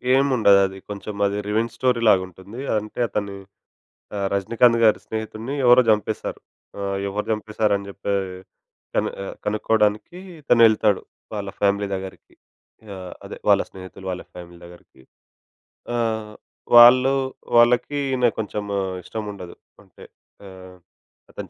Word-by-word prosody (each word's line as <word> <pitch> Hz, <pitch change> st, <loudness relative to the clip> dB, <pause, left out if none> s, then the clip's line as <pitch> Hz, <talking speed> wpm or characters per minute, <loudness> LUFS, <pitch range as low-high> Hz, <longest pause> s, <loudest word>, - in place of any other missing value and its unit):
ఏముండదు 125 Hz, -8 st, +4 dB
అది. 95 Hz, 0 st, -10 dB
కొంచెం 105 Hz, +1 st, -6 dB
అది 100 Hz, +1 st, -3 dB
రివెంజ్ 110 Hz, +2 st, -1 dB
స్టోరీ‌లాగుంటుంది. 110 Hz, -4 st, 0 dB, 0.2 s
అంటే 105 Hz, +3 st, -6 dB
అతని 100 Hz, -1 st, -3 dB, 0.8 s
ఆహ్, 100 Hz, -1 st, -1 dB
'రజనీకాంత్‌' 115 Hz, +4 st, +3 dB
గారి 110 Hz, -, +4 dB
స్నేహితుడిన్ని 110 Hz, +4 st, -5 dB
ఎవరో 125 Hz, +1 st, +7 dB
జంపేశారు. 105 Hz, -3 st, -1 dB, 0.4 s
ఆహ్, 100 Hz, 0 st, -2 dB
ఎవరు 105 Hz, +2 st, -3 dB
చంపేశారని 105 Hz, -2 st, -1 dB
చెప్పి 100 Hz, 0 st, -4 dB, 0.8 s
కన్ -, -, +1 dB
ఆహ్, -, -, -7 dB
కనుక్కోవడానికి 105 Hz, -, 0 dB, 0.2 s
ఇతనెళ్తాడు. 110 Hz, -6 st, +4 dB, 0.3 s
వాళ్ళ 100 Hz, -2 st, -4 dB
ఫ్యామిలీ 100 Hz, 0 st, +1 dB
దగ్గరికి. 95 Hz, 0 st, -9 dB, 0.6 s
ఆహ్, 90 Hz, -1 st, -8 dB
అదే -, -, -8 dB
వాళ్ళ -, -, +5 dB
స్నేహితులు 95 Hz, 0 st, -12 dB
వాళ్ళ 90 Hz, -, -6 dB
ఫ్యామిలీ 85 Hz, -1 st, -11 dB
దగ్గరికి, 85 Hz, -6 st, -17 dB, 0.9 s
ఆహ్, 110 Hz, -2 st, -2 dB, 0.4 s
వాళ్ళు 125 Hz, +3 st, +8 dB, 0.4 s
వాళ్ళకి 125 Hz, +4 st, +3 dB
ఈయన 125 Hz, -2 st, +1 dB
కొంచెం 105 Hz, -1 st, -3 dB, 0.4 s
ఇష్టముండదు. 100 Hz, -5 st, -7 dB, 0.3 s
అంటే -, -, -17 dB, 0.4 s
ఆహ్, 95 Hz, -1 st, -13 dB, 0.5 s
అతను -, -, -8 dB
105 Hz, 115 wpm, -22 LUFS, 100-115 Hz, 0.9 s, వాళ్ళు